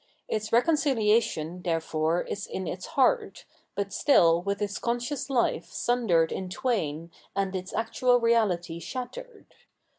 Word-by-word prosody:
Its 215 0 -3
reconciliation, 230 - +2
therefore, 165 -1 0
is 205 - -5
in 190 - -4
its 180 +3 -5
heart, 430 - +1 0.3
but 200 -1 -3
still 170 - +4
with 200 +2 -2
its 205 -1 -3
conscious 240 +3 -2
fife 260 -4 0
sundered 200 -10 +1
in 190 -1 -4
twain 175 - -2 0.2
and 195 -1 -1
its 185 0 -5
actual 245 +2 +2
reality 200 -8 +1
shattered. 415 - -8
205 Hz, 125 wpm, -27 LUFS, 175-245 Hz, 0.3 s, still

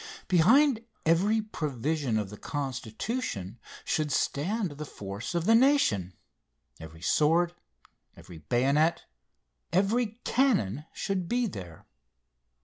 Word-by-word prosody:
Behind 230 - +4 0.2
every 200 +7 +3
provision 145 - -2
of 105 -2 -3
the 105 - -9
Constitution 130 - -4 0.3
should 155 -2 0
stand 185 +9 0
the 145 +1 -7
force 100 - -6
of 170 -1 0
the 225 - +5
nation. 225 - +3 0.6
Every 80 +1 -11
sword, 170 - +3 0.6
every 85 -3 -12
bayonet, 140 - +1 0.7
every 215 +4 +1
cannon 150 - +1
should 190 -4 -3
be 245 0 +1
there. 90 - -8
155 Hz, 105 wpm, -28 LUFS, -, 0.7 s, the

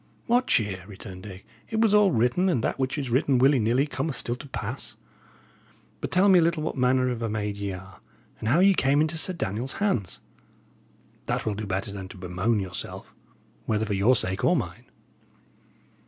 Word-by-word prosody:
"What 245 +1 +2
cheer!" 100 -5 +1
returned 95 -2 -10
Dick. 95 -1 -10 0.2
"It 220 - -1
was 220 -2 +3
all 210 -1 +6
written, 125 +8 +2
and 125 -10 0
that - - -1
which 130 +3 -1
is 135 -4 -3
written, 130 +1 +2
willy 135 +2 +4
nilly, 120 +5 +2
cometh 145 0 -3
still 120 - -1
to 140 - -10
pass. - - -5 1.0
But - - -4
tell 185 +2 +4
me 190 -2 +7
a - - +4
little 165 -1 +1
what 160 - -3
manner 130 -1 +2
of 120 -2 -3
a 115 - -1
maid 105 -1 -2
ye 100 -1 -4
are, 95 +1 -11 0.4
and 110 - -2
how 160 +9 +4
ye 195 +1 +6
came 140 -4 +2
into 155 +2 +1
Sir 185 - +2
Daniel's 125 - -3
hands; 190 - -1 1.1
that - - -1
will 110 - 0
do 105 +1 -5
better 100 +3 -2
than 100 -2 -7
to 95 - -12
bemoan 95 +5 -1
yourself, 95 -2 -6 0.5
whether 110 0 +1
for 105 - -2
your 100 +6 +4
sake 95 -3 0
or 180 - +4
mine." 115 - -4
120 Hz, 200 wpm, -26 LUFS, 100-155 Hz, 1.1 s, me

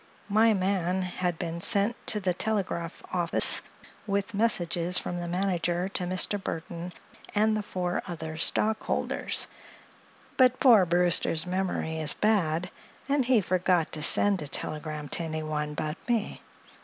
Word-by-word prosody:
My 220 +2 +4
man 185 -1 0
had 180 -1 -2
been 170 0 -4
sent 205 +6 +2
to 210 - +3
the 185 -2 0
telegraph 180 -4 -3
office 175 -2 +2 0.5
with 200 +2 -1
messages 180 -5 +1
from 175 - -3
the 175 - -4
manager 175 0 -1
to 185 -2 -2
Mr. 185 +3 -1
Burthon 170 +1 -5 0.4
and 215 +1 +3
the 215 - -1
four 180 -3 -3
other 160 -3 -6
stockholders; 215 +7 +1 0.9
but 255 -1 +4
poor 225 -9 +6
Brewster's 175 -1 +2
memory 180 -3 -2
is 155 -1 +2
bad, 180 -5 0 0.4
and 280 -2 +1
he 245 -3 +4
forgot 180 -2 +1
to 155 - -5
send 195 +4 +5
a 150 - -5
telegram 150 0 -3
to - - -1
anyone 155 -2 -3
but 155 +2 -3
me. 230 -3 -1
180 Hz, 140 wpm, -27 LUFS, 165-205 Hz, 0.9 s, poor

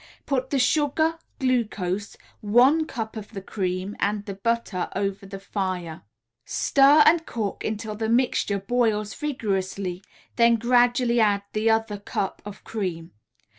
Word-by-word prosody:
Put 260 -2 -1
the 280 - 0
sugar, 310 +4 +2 0.2
glucose, 215 - -1 0.2
one 255 +9 +4
cup 225 -1 -5
of 215 0 -8
the 200 - -4
cream 185 0 -3
and 205 0 -1
the 200 - -5
butter 210 -2 -2
over 195 0 -2
the 195 0 -7
fire; 185 -4 -4 0.4
stir 280 - +5
and 325 +1 +5
cook 215 -4 -3
until 215 0 -3
the 220 +1 -3
mixture 235 -4 +1
boils 215 0 0
vigorously, 195 - -3 0.3
then 235 -1 +5
gradually 240 +1 +3
add 205 -2 +3
the 215 +1 +1
other 220 -2 0
cup 200 -1 -3
of 205 -1 -9
cream. 180 -6 -4
215 Hz, 135 wpm, -24 LUFS, 195-245 Hz, 0.4 s, stir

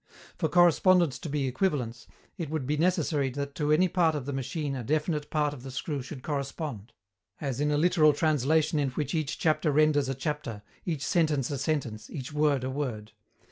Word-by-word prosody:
For - - -1
correspondence 175 -3 +4
to 165 - -6
be 140 -1 -1
equivalence, 130 -4 -1 0.3
it 165 -6 -5
would 155 -4 -2
be 150 +3 0
necessary 155 -4 +1
that 140 +2 -4
to 150 0 -1
any 175 +5 +5
part 170 -3 +2
of 140 -4 -4
the 140 - -3
machine 135 +2 -3
a 125 - -4
definite 150 +2 -1
part 150 -2 +1
of 140 - -9
the 135 - -8
screw 140 +2 -3
should 130 0 -9
correspond 140 - -4 0.5
as 135 -2 -3
in 150 - +2
a 145 - +2
literal 160 -1 +5
translation 155 +1 +2
in 140 -2 +1
which 140 +2 -3
each 155 -4 -1
chapter 155 -1 +2
renders 145 -2 +3
a 135 - -1
chapter, 135 -7 -4 0.2
each 155 -5 -2
sentence 155 -7 +1
a 140 - -2
sentence, 120 -9 -2
each 140 0 -6
word 150 -3 +2
a 130 - -2
word. 120 -7 -4
145 Hz, 195 wpm, -28 LUFS, 135-155 Hz, 0.5 s, any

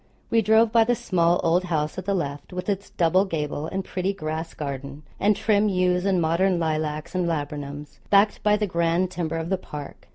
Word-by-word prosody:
We 230 -1 +4
drove 220 +2 +4
by 230 0 +5
the 240 +2 +1
small 175 -5 +1
old 175 +2 +2
house 155 -3 -1
at 185 - -8
the 200 0 0
left, 145 -3 -4
with 180 +2 -4
its 200 0 -2
double 180 +3 +3
gable 150 -4 -3
and 190 +2 -4
pretty 190 +2 -2
grass 160 -2 -5
garden, 140 0 -6 0.2
and 210 +1 +3
trim 210 0 +2
yews 180 -1 +1
and 190 -2 +2
modern 175 +3 +2
lilacs 155 -2 -2
and 180 -2 0
laburnums, 145 -2 -5
backed 205 +1 +4
by 210 0 +3
the 210 - 0
grand 170 0 0
timber 165 -2 -3
of 165 +1 -4
the 190 -1 0
park. 145 -5 -9
175 Hz, 200 wpm, -24 LUFS, 155-195 Hz, 0.2 s, by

